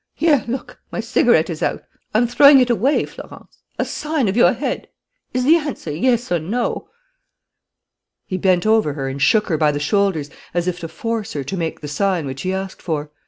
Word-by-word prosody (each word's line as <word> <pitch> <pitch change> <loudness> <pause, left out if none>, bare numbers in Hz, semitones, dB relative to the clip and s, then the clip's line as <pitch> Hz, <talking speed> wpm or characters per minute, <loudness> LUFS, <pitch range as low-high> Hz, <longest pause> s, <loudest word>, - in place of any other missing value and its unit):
Here, 305 -5 +3
look, 245 0 -5
my - - -4
cigarette 230 -7 +3
is 165 -3 -6
out. - - -1 0.3
I'm 230 +3 +4
throwing 280 +4 +7
it 250 -1 +3
away, 260 +5 +2
Florence. - - -13 0.2
A - - 0
sign 300 -5 -2
of 190 - -1
your 240 - +5
head: - - -3 0.4
is 255 0 -1
the 315 +6 +6
answer 290 - -5
yes 235 - 0
or 175 - +2
no?" 235 - -3 1.4
He 185 - -4
bent 180 0 +2
over 215 -9 +3
her 135 -2 -4
and 135 +1 -5
shook 210 +8 +4
her 160 -4 -1
by 150 -2 +3
the 145 - -3
shoulders, 160 -3 0 0.2
as 175 0 0
if 180 -1 -2
to 165 - -5
force 220 +6 -4
her 145 - -3
to 140 - -5
make 165 -3 -3
the 150 - -6
sign 180 +1 0
which 135 0 -6
he 185 - -2
asked 190 0 -5
for. 150 -3 -3
195 Hz, 205 wpm, -20 LUFS, 160-245 Hz, 1.4 s, throwing